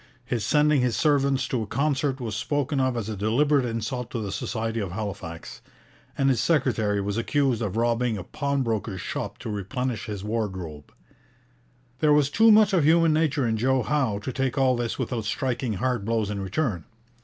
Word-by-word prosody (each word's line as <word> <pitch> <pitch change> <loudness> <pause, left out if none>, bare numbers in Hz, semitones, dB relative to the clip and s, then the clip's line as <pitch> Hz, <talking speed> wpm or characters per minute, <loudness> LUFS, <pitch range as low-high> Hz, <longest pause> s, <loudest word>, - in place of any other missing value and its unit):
His 120 -4 -2
sending 150 +2 +3
his 125 -2 +1
servants 140 -3 +2
to 125 - -1
a 110 - -4
concert 140 +1 0
was 115 -4 -4
spoken 145 -1 -1
of 130 -2 +1
as 110 -3 -3
a 110 - -3
deliberate 130 +7 +2
insult 115 +1 -3
to 120 - -4
the 100 -3 -4
society 115 +2 -3
of 95 -5 -4
Halifax; 100 -5 -6 0.6
and 135 - +2
his 130 -3 +2
secretary 115 -10 +1
was 100 +1 -2
accused 135 -1 +1
of 105 -1 -2
robbing 120 -1 +1
a 95 - -6
pawnbroker's 115 - -2
shop 90 - -4
to - - -7
replenish 115 +4 -3
his 100 -3 -5
wardrobe. 95 - -4 1.1
There 150 +1 +4
was 145 -1 +3
too 225 +6 +5
much 215 -1 +6
of 175 -5 +3
human 165 +1 +4
nature 155 -4 +1
in 110 -1 0
Joe 130 +2 +2
Howe 130 -6 0
to 130 - -4
take 135 +1 -1
all 130 -2 +3
this 120 -1 -2
without 115 -4 -3
striking 125 -1 -1
hard 125 +1 -1
blows 110 -1 -1
in 100 -1 -3
return. 95 - -2
120 Hz, 185 wpm, -25 LUFS, 105-140 Hz, 1.1 s, much